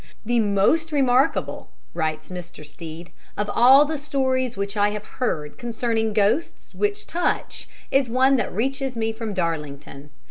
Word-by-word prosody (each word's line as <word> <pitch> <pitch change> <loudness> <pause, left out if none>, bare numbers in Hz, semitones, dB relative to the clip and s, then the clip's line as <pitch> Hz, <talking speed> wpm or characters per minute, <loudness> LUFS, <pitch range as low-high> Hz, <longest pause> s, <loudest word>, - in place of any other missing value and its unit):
"The 240 +1 +2
most 220 +11 +2
remarkable," 265 -2 +1 0.2
writes 160 +1 -3
Mr. 175 -4 -8
Stead, 165 +3 -9 0.3
"of 210 0 -1
all 265 +5 +7
the 305 0 -3
stories 260 -4 -1
which 200 +1 -3
I 205 0 +3
have 210 0 -5
heard 155 -14 -3
concerning 230 -2 -1
ghosts 215 +10 0
which 415 0 -1
touch 345 +1 -2 0.2
is 270 -2 +2
one 260 +3 +4
that 240 - -1
reaches 270 +4 -2
me 225 -1 -1
from 220 -2 -5
Darlington. 150 -4 -4
225 Hz, 145 wpm, -23 LUFS, 190-265 Hz, 0.3 s, all